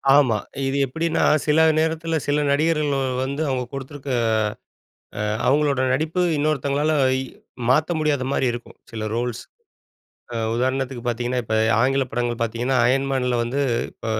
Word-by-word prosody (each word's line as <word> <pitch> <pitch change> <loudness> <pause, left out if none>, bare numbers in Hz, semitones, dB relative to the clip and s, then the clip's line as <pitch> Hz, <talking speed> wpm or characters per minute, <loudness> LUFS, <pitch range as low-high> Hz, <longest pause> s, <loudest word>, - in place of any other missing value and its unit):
ஆமா. 130 -7 +4 0.3
இது 135 +1 -1
எப்படின்னா 160 +5 -1 0.2
சில 150 +1 +3 0.2
நேரத்துல, 160 0 0
சில 145 +1 +2
நடிகர்கள் 150 0 +1 0.3
வந்து 140 +3 -3
அவங்க 130 -1 -1
கொடுத்திருக்க 135 0 -6 1.1
ஆ - - 0 0.2
அவங்களோட 140 -1 +2
நடிப்பு 155 +6 0 0.2
இன்னொருத்தங்களால 145 0 0 0.3
இ - - -2 0.5
மாத்த 155 +6 +3
முடியாத 150 -4 0
மாரி 130 - +1
இருக்கும். 120 0 -9
சில 110 -2 -4
ரோல்ஸ். 120 0 -2 0.9
அ - - -4 0.2
உதாரணத்துக்கு 130 0 -1
பார்த்தீங்கன்னா, 120 +1 -1
இப்ப 110 0 -2 0.3
ஆங்கில 135 +2 +2
படங்கள் 120 0 -2
பார்த்தீங்கன்னா. 120 +3 0
அயன் 135 +2 +2
மேன்ல 125 -2 0
வந்து, 125 +4 -2 0.3
இப்ப - - -13
135 Hz, 135 wpm, -22 LUFS, 125-150 Hz, 1.1 s, ஆமா